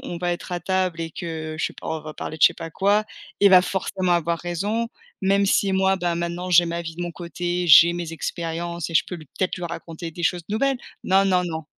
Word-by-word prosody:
on 175 - -5
va 175 0 0
être 175 - -7
à 175 - -1
table 185 -2 -1
et 165 0 -4
que 160 -3 -5
je - - 0
sais - - -2
pas, - - -10
on 160 0 -2
va 155 0 -8
parler 155 - -6
de - - -4
je - - +10
sais - - -10
pas 165 -1 -7
quoi, 205 +5 +2 0.4
il 200 - +6
va 185 -1 +8
forcément 185 -1 -1
avoir 170 -1 +1
raison, 205 +7 -2 0.3
même 195 +1 +3
si 195 0 +2
moi, 190 0 +3
bah, 175 -2 -1
maintenant 170 +1 -3
j'ai 175 0 +6
ma 170 0 -3
vie 165 -1 -7
de 175 - -4
mon 175 -1 -4
côté, 175 +1 -3
j'ai 170 +2 +9
mes 170 -2 -5
expériences 170 +1 -4
et 165 - -8
je - - +4
peux - - -6
l 155 -4 -10
peut-être 185 -1 0
lui 180 - -5
raconter 165 0 -6
des 170 +2 -8
choses 175 +1 0
nouvelles. 260 +5 0 0.3
Non, 195 +1 +4
non, 180 -2 +2
non, 160 -2 -4
175 Hz, 255 wpm, -23 LUFS, 165-190 Hz, 0.4 s, je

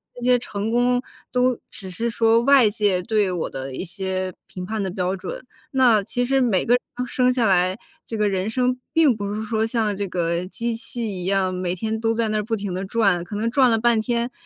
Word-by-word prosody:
这 245 - -10
些 250 0 +4
成 210 -2 -4
功 245 +1 +2 0.3
都 250 -1 +1
只 190 -1 -9
是 230 +6 -2
说 230 0 +3
外 265 -4 +6
界 205 -4 +1
对 210 -1 +1
我 180 -3 -2
的 135 0 -6
一 - - -4
些 185 0 -3
评 180 -1 -7
判 220 +2 -3
的 190 - -2
标 185 0 -1
准， 195 +6 -6 0.3
那 250 -5 +4
其 245 +5 -1
实 270 +2 +2
每 230 -8 +2
个 235 - +3
人 250 0 -4
生 250 +1 +2
下 245 -2 +1
来， 185 -1 +3 0.3
这 225 - -5
个 210 -1 +2
人 195 +2 -1
生 250 +1 0
并 320 -5 +5
不 205 -1 -4
是 215 - -3
说 220 0 0
像 225 -3 0
这 200 0 -2
个 175 0 -1
机 235 +4 -2
器 235 +1 -4
一 185 -3 -4
样， 190 -1 +1
每 180 -1 -2
天 220 +4 -3
都 225 0 +1
在 225 -1 0
那 215 - 0
儿 210 - -1
不 225 +2 -1
停 200 -3 -4
地 185 +2 -3
转， 195 -4 +2
可 205 - -7
能 225 +3 -1
转 260 0 +4
了 225 - +3
半 235 0 +3
天， 235 +2 -1
220 Hz, 250 characters per minute, -22 LUFS, 190-240 Hz, 0.3 s, 外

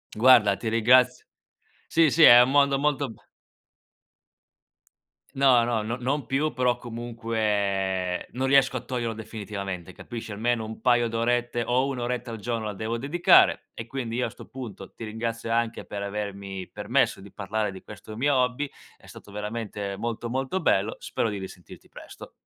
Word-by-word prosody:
Guarda, 110 -4 +6
ti 115 - -2
ringrazio. 125 +3 +4 0.6
Sì, 160 -3 +4
sì, 165 - +3
è 120 0 +10
un 125 - +2
mondo 140 -1 +4
molto 140 -3 0
be 110 - -14 2.2
No, 130 -3 +5
no, 115 -2 0
no 115 +3 -3
non 135 +1 -2
più, 135 +2 0
però 125 -1 +1
comunque 105 -6 -2
non 130 +2 -1
riesco 135 -1 +4
a 125 - -5
toglierlo 120 -3 -3
definitivamente, 100 -5 -6
capisci. 115 +3 -8
Almeno 115 +2 0
un 110 0 -7
paio 120 -2 +3
d'orette 120 +1 0
o 130 +2 +1
1 130 -3 -3
oretta 125 0 -3
al 115 - -5
giorno 115 0 -3
la 105 - -3
devo 110 +4 -3
dedicare, 175 +8 +4
e 115 - -8
quindi 120 -3 -4
io 125 - 0
a - - -6
sto 120 - -13
punto 110 -7 -9
ti - - -9
ringrazio 115 +1 -4
anche 115 0 -1
per 100 -1 -5
avermi 100 -2 -5
permesso - - 0
di 100 0 -13
parlare 105 +1 -2
di 95 - -10
questo 105 +1 -11
mio 140 +4 +1
hobby. 125 +3 0 0.3
È - - -20
stato 100 - -13
veramente 105 -1 -5
molto, 115 +2 -4
molto 135 +9 -2
bello. 100 +3 +1
Spero 115 - -2
di 105 - -4
risentirti 95 -2 -11
presto. - - -12
115 Hz, 170 wpm, -26 LUFS, 105-125 Hz, 2.2 s, è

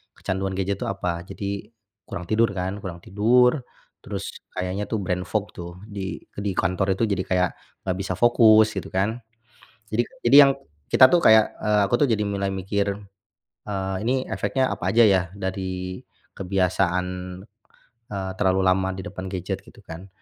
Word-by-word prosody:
kecanduan 95 0 -3
gadget 95 +1 -1
tuh - - -3
apa. 90 -3 -3
Jadi 100 +1 -5 0.4
kurang 90 - -5
tidur 115 +1 +3
kan? 95 +2 -3
Kurang 85 -3 -8
tidur, 125 +7 +3 0.4
terus - - -5 0.2
kayaknya 90 +3 -3
tuh 110 - -1
brain 90 +1 -2
fog 105 -1 -2
tuh 85 0 -8
di 100 -3 -6
eee, - - -12
di 100 - 0
kantor 95 +1 +1
itu 115 - -1
jadi 100 -4 0
kayak, 90 -1 +2 0.3
nggak 95 -1 -2
bisa 95 -1 -2
fokus, 110 -1 +5
gitu 95 - -4
kan. 105 +5 0 0.7
Jadi 110 +3 +2 0.2
jadi 135 - +7
yang - - +3 0.4
kita 130 - +8
tuh 175 - +6
kayak, 110 -1 +6
eee, 105 -1 +3
aku 110 - -2
tuh - - -5
jadi 110 -2 +1
mulai 100 -1 -1
mikir, 100 +1 -1 0.7
eee, 95 -1 -2
"Ini 130 +3 0
efeknya 105 +7 0
apa - - -4
aja 120 - +6
ya 95 -3 +4 0.2
dari 95 -1 -4 0.4
kebiasaan, 90 -1 +1 1.1
eee, 95 -2 -3
terlalu 95 -1 +2
lama 95 +1 +2
di 95 - -6
depan 95 -2 -7
gadget?" 95 +1 -4
Gitu 115 - -17
kan. 90 +1 -9
95 Hz, 165 wpm, -24 LUFS, 95-105 Hz, 1.1 s, kita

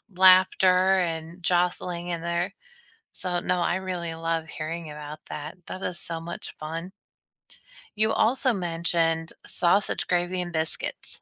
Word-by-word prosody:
laughter 185 0 +6
and 165 0 -3
jostling 175 0 +1
in 170 -1 -2
there. 170 +3 -1 0.6
So, 180 -1 -1
no, 180 +1 +1
I 175 0 +1
really 180 -3 -3
love 165 0 -1
hearing 160 +1 -5
about 150 0 -7
that. 150 +4 -6
That 185 - -6
is 180 -1 -3
so 165 -1 -5
much 170 +1 -7
fun. 165 +4 -5 1.1
You 220 +1 +3
also 255 +3 +3
mentioned, 165 -2 0
sausage 180 +3 +1
gravy 180 +1 +1
and 175 -1 -4
biscuits. 160 -1 -3
175 Hz, 135 wpm, -26 LUFS, 165-185 Hz, 1.1 s, laughter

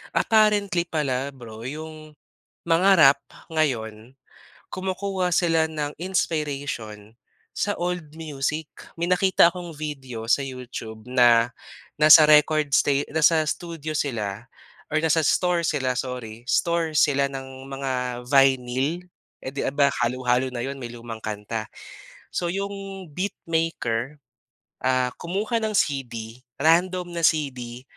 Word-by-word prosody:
apparently 205 -5 +3
pala 140 -5 -1
bro 115 -1 -9
'yong 155 +1 -8 0.5
mga 170 +3 +3
rap 140 -2 +7 0.3
ngayon, 120 -4 -2 0.5
kumukuha 190 0 -2
sila 165 -2 +2
ng 150 -2 -3
inspiration, 145 - -3 0.4
sa 205 - -1
old 175 -3 -4
music. 150 -1 -3 0.2
May 170 - -2
nakita 180 -1 +4
akong 175 -3 -8
video 135 -7 -6
sa 115 - +2
YouTube 125 -5 -7
na, 120 -1 +4 0.5
nasa 155 0 +9
record 150 -1 +4
sta - - +4 0.2
nasa 160 0 +4
studio 160 -1 -4
sila 115 -6 -3 0.4
or 155 - -2
nasa 160 +1 +3
store 175 +2 +2
sila 130 -4 0
sorry, 125 -3 -5
store 170 -2 +1
sila 140 -2 +3
ng 135 0 -9
mga 125 -3 -3
vinyl. 135 +4 +2 0.4
Eh, 130 - -5
'di 140 - -4 0.2
ba, 140 -1 +4
halu-halo 125 +1 +1
na 120 -1 -5
'yon 135 0 -5
may 120 - -5
lumang 115 -1 -8
kanta. 110 +1 -5 0.6
So, 175 - -1
'yong 195 -2 -5
beatmaker, 160 - -2 0.7
ah, 130 -1 +1
kumuha 210 +6 -2
ng 220 - 0
CD 125 - -2 0.2
random 175 +2 +2
na 170 - -4
CD 125 -6 -2
145 Hz, 120 wpm, -24 LUFS, 125-170 Hz, 0.7 s, nasa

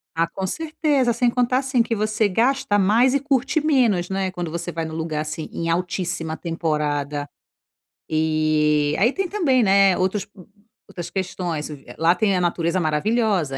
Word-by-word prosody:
Ah, 165 +1 +1
com 190 +3 -5
certeza. 295 - 0
Sem 240 +1 +2
contar, 250 +1 +1
assim, 265 -2 +1
que 230 - -2
você 215 0 +1
gasta 240 +2 +1
mais 225 +6 +3
e 280 - +2
curte 280 +2 0
menos, 235 - +2
né, 190 -1 -1
quando 175 -3 -5
você 170 +1 -4
vai 165 -1 -3
num 160 0 -6
lugar 160 -2 -2
assim, 155 0 -5
em 165 0 -3
altíssima 175 -2 -2
temporada. 150 -4 -2 0.8
E 155 -1 +1
aí 235 +7 +3
tem 390 -1 -2
também, 315 - +2
né, 195 -2 +4
outros 190 +2 -1 0.6
outras 175 -2 -7
questões 175 -5 -3
v 145 -3 -11
lá 165 +1 +4
tem 195 +2 +1
a 180 - +1
natureza 170 0 0
maravilhosa, 180 - 0
185 Hz, 165 wpm, -22 LUFS, 160-235 Hz, 0.8 s, né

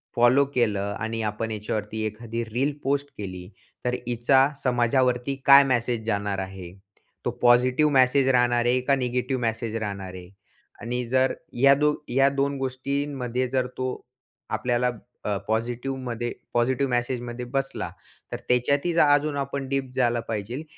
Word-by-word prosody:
Follow 125 +4 +5
केलं 100 -4 +1
आणि 115 +1 -3
आपण 110 +1 -3
याच्यावरती 105 0 -3
एखादी 115 +2 -4
रील 125 +6 -1
पोस्ट 140 +1 0
केली. 95 -3 -7 0.4
तर 125 - +1
हिचा 125 +3 +4 0.2
समाजावरती 125 +1 +1
काय 140 0 +9
मेसेज 120 -3 0
जाणार 100 -2 -1
आहे? 95 -2 -7 0.5
तो 120 - +1
पॉझिटिव्ह 125 +5 +4
मेसेज 130 +1 +4
राहणार 120 -2 +3
आहे, 125 +1 +3
का 140 +2 +2
निगेटिव्ह 125 0 -1
मेसेज 115 -1 -2
राहणार 100 -4 -5
आहे? 90 -1 -10 0.5
आणि 125 +1 -2
जर 130 +2 +2 0.2
या 135 +3 +6
दो 150 +1 +2 0.2
या 135 +2 +4
2 140 0 -1
गोष्टींमध्ये 130 -1 -2
जर 130 0 0
तो 130 - -1 0.6
आपल्याला 125 0 0 0.3
अ, 105 - 0
पॉझिटिव्हमध्ये 120 +1 -2 0.2
पॉझिटिव्ह 130 +3 +1
मॅसेजमध्ये 120 0 -2
बसला. 135 0 -2 0.4
तर - - -3
त्याच्यात 140 +5 +2 0.2
अजून 145 0 +2
आपण 140 0 -3
डीप 135 -1 -1
झालं 120 -2 +2
पाहिजेल, 115 +6 -4
125 Hz, 140 wpm, -25 LUFS, 115-135 Hz, 0.6 s, काय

